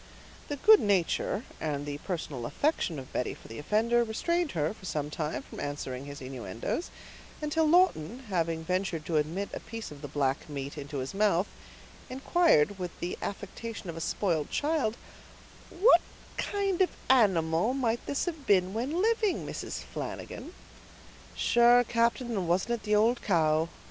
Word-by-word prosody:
The 290 - -2
good 430 +9 +7
nature 200 +2 +1 0.2
and 145 -2 -2
the 145 0 -4
personal 150 -9 -4
affection 285 - 0
of 130 -1 -9
Betty 125 - -1
for - - -15
the 115 - -8
offender, 230 +8 +2
restrained 340 +9 -1
her, 155 +1 0
for 215 - -19
some 150 -2 -2
time, 150 -4 -3
from - - -10
answering 140 -2 -4
his 145 0 -8
innuendoes, 125 - -4 0.5
until 310 +1 +1
Lawton, 270 - +3
having 165 -3 0
ventured 180 -2 -1
to 160 0 0
admit 165 +7 -1
a - - -3
piece 225 -5 -7
of 145 -1 -11
the 145 - -5
black 140 0 -1
meat 140 0 -5
into 145 -1 -6
his 130 0 -4
mouth, 200 -2 +3 0.6
inquired, 255 - +3
with 180 -1 -5
the 175 - -3
affectation 205 -1 -5
of - - -10
a 165 - -6
spoiled 165 -5 0
child,— 285 -7 0 0.7
"What 405 +8 +6 0.3
kind 395 -3 0
of 370 - +4 0.2
animal 190 -3 +3
might 240 -3 0
this 285 - 0
have 315 -6 -5
been 185 -1 +3
when 280 - -1
living, 445 -3 +1
Mrs. - - -5
Flanagan?" - - -7 0.8
"Sure, 240 +1 +5
captain, 235 +1 +1
and 195 -6 -1
wasn't 180 +7 +1
it 235 - -2
the 210 0 +3
ould 230 +4 +3
cow?" 160 -4 +2
195 Hz, 160 wpm, -29 LUFS, 155-245 Hz, 0.8 s, good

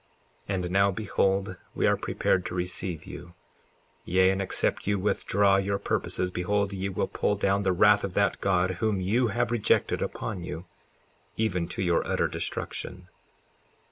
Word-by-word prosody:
54:9 100 - +1
And 90 -1 -3
now 100 +1 +4
behold, 95 -1 0 0.2
we - - +1
are - - +4
prepared 90 - 0
to 90 - -5
receive 90 -2 -3
you; 85 0 -10 0.7
yea, 95 +1 +3
and 95 0 -1
except 95 - 0
you 100 0 +2
withdraw 100 0 +2
your 100 +1 0
purposes, 90 -2 -1
behold, 100 +3 0
ye 95 0 -2
will 95 - -1
pull 105 - 0
down 100 0 +1
the 95 -2 +1
wrath 105 +3 +5
of 95 -2 -4
that 100 -1 +1
God 95 -1 +2
whom 105 +2 -1
you 110 +7 +2
have 120 +2 -1
rejected 120 -3 +2
upon 100 -5 -4
you, 85 0 -6 0.7
even 90 -6 0
to 95 - -3
your 85 -2 +2
utter - - +1
destruction. 90 0 -5
95 Hz, 165 wpm, -27 LUFS, 90-100 Hz, 0.7 s, wrath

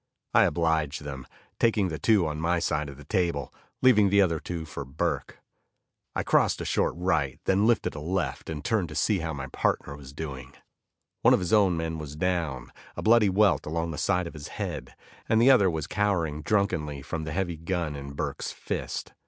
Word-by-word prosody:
I - - +6
obliged 80 -3 0
them, 70 -2 -7 0.3
taking 110 -5 +2
the 80 -1 -5
two 105 -6 +4
on 75 0 -3
my 85 +2 +2
side 75 -3 -1
of 70 - -10
the 75 - -11
table, 85 - -1 0.3
leaving 105 -6 +6
the 100 +1 +4
other 85 -5 +3
two 85 -1 -5
for 75 - -6
Burke. 65 0 -3 0.8
I - - 0
crossed - - +3
a - - -4
short - - +1
right, 80 -7 0
then 100 +3 +3
lifted 120 -1 +2
a 75 - -6
left, 90 +4 -2
and 75 -2 -5
turned 110 -8 +1
to 80 - -8
see 105 -3 +2
how 80 -1 -3
my 70 -2 -5
partner 70 - -1
was 70 -2 -11
doing. 70 -3 -7 0.7
One - - +6
of - - -1
his 90 +2 -2
own 100 -5 +4
men 80 -1 -3
was 75 -1 -7
down, 80 -7 -2 0.3
a - - -4
bloody 110 -2 +5
welt 100 -2 +3
along 85 +1 -2
the 75 - -5
side 90 -2 +1
of 85 - -7
his 75 -2 -8
head, - - -5 0.3
and 110 - +4
the 125 +4 +7
other 100 -8 +5
was 80 -3 -2
cowering 85 -8 0
drunkenly 80 -6 0
from 80 +3 -4
the 80 - -4
heavy 85 0 -2
gun 85 -2 -2
in 70 0 -7
Burke's - - -3
fist. - - -5
80 Hz, 200 wpm, -27 LUFS, 75-95 Hz, 0.8 s, the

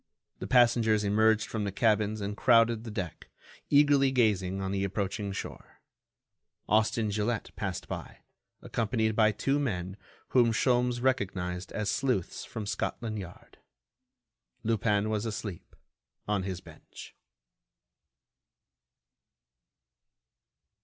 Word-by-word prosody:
The - - -5
passengers 115 -3 +4
emerged 110 +2 +3
from 110 -2 -3
the 100 - -2
cabins 105 0 +1
and 100 +1 -3
crowded 115 -1 +4
the - - -5
deck, 95 -6 -6 0.4
eagerly 145 -1 +5
gazing 100 -7 +1
on 95 0 -3
the 100 0 -1
approaching 100 +2 -2
shore. 95 - -8 0.9
Austin 110 0 +2
Gilette 110 +2 -2
passed 95 -4 -4
by, - - -7 0.4
accompanied 110 -1 0
by 110 -1 +4
two 135 +7 0
men 95 -8 -3 0.3
whom 120 -3 +4
Sholmes 125 +1 +1
recognized 95 -8 -1
as 105 -1 -1
sleuths 125 -10 -1
from 110 -2 -6
Scotland 110 +2 -3
Yard. 90 -3 -11 1.0
Lupin 110 -2 +1
was 110 +1 -1
asleep, 105 -5 -6 0.5
on 105 -2 +1
his 95 -1 -4
bench. - - -13
110 Hz, 110 wpm, -29 LUFS, 100-115 Hz, 1.0 s, eagerly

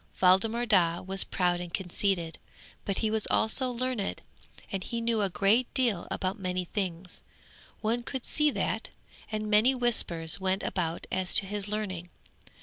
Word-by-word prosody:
Waldemar 220 +6 +4
Daa 175 -6 +3
was 190 +1 +1
proud 175 -1 0
and 175 -1 -6
conceited, 180 -2 -1 0.5
but 200 - -1
he 215 - +1
was 220 -1 0
also 255 +4 +2
learned, 245 -4 -2 0.5
and 195 -1 -3
he 235 - -3
knew 230 -1 +1
a 200 - +1
great 205 +7 +2
deal 235 -9 +1
about 190 +3 -2
many 180 -1 -2
things. 180 -2 -4 0.6
One 230 +2 0
could 255 +1 -5
see 300 -1 +3
that, - - -2 0.4
and 215 0 -2
many 215 +5 +4
whispers 200 -9 +1
went 190 0 0
about 170 -3 -2
as 185 -1 0
to 200 - +6
his 205 0 -3
learning. 195 -5 -3
200 Hz, 155 wpm, -29 LUFS, 180-225 Hz, 0.6 s, to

